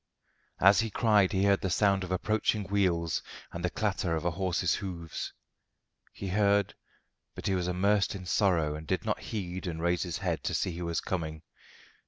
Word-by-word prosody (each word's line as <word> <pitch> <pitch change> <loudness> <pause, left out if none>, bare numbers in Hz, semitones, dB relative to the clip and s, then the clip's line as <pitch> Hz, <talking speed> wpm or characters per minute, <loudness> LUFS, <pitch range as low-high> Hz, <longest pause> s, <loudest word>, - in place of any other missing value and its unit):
As 100 +2 +6
he 115 -1 +1
cried 105 -3 +3
he 95 -2 +1
heard 100 -1 +3
the 95 - -1
sound 100 +1 +2
of 90 - -6
approaching 105 +2 +1
wheels 90 -4 +1 0.3
and 85 - -6
the 90 - +1
clatter 95 -5 -1
of 80 +1 -3
a 85 - +2
horse's 90 0 0
hoofs. 85 -5 -5 0.8
He 95 - -6
heard, 100 0 +2 0.6
but - - -8
he 95 - +1
was 90 -1 0
immersed 100 +3 +2
in 95 -2 -7
sorrow 85 -5 +2
and 75 +1 -7
did - - -1
not - - 0
heed 95 -3 -5
and 80 -2 -4
raise 85 +1 +1
his 85 -4 -2
head - - -2
to - - 0
see 90 - -1
who 85 0 -4
was 85 -1 -1
coming. 80 -3 -4
95 Hz, 190 wpm, -30 LUFS, 85-100 Hz, 0.8 s, As